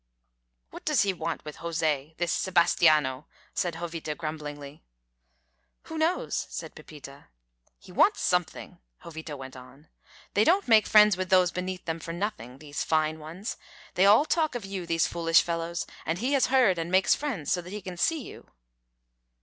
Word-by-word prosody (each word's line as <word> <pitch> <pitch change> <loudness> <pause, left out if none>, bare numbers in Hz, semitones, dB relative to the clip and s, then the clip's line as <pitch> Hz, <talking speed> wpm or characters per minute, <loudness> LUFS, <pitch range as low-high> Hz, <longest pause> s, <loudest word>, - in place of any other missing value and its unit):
"What - - -10
does 300 -7 +2
he 195 -1 0
want 165 -2 -4
with 150 - -8
José 160 -2 -2
this 175 0 -1
Sebastiano?" 155 -6 +2 0.3
said 175 -2 -1
Jovita, 165 -2 -5
grumblingly. 150 -2 -7 1.0
"Who 320 - -7
knows?" 330 +3 0
said - - -7
Pepita. 140 -2 -12 0.5
"He - - -16
wants - - +3
something," - - -1 0.2
Jovita 160 -2 -8
went 130 0 -9
on. 130 +4 -15 0.4
"They 205 - +4
don't 365 - +3
make 220 -2 +5
friends 210 -3 +6
with 185 -1 -3
those 185 -1 +4
beneath 185 0 -5
them 165 0 -3
for 165 +1 -6
nothing, 170 - -5
these 145 0 -5
fine 155 0 0
ones. 165 +7 -7 0.4
They 190 +2 +4
all 215 +9 +6
talk 315 -4 0
of 235 -5 -4
you, 195 -3 -5
these 165 -1 +2
foolish 165 -1 +3
fellows, 170 +1 -3 0.2
and 165 +2 -2
he 250 +8 -1
has 270 -3 +3
heard, 245 -10 +3
and 165 +1 -3
makes 190 +1 +4
friends 235 - -3
so 180 - +1
that 175 - -11
he 210 +2 -5
can 185 -2 -8
see 315 - 0
you." - - -12
170 Hz, 170 wpm, -27 LUFS, 155-200 Hz, 1.0 s, friends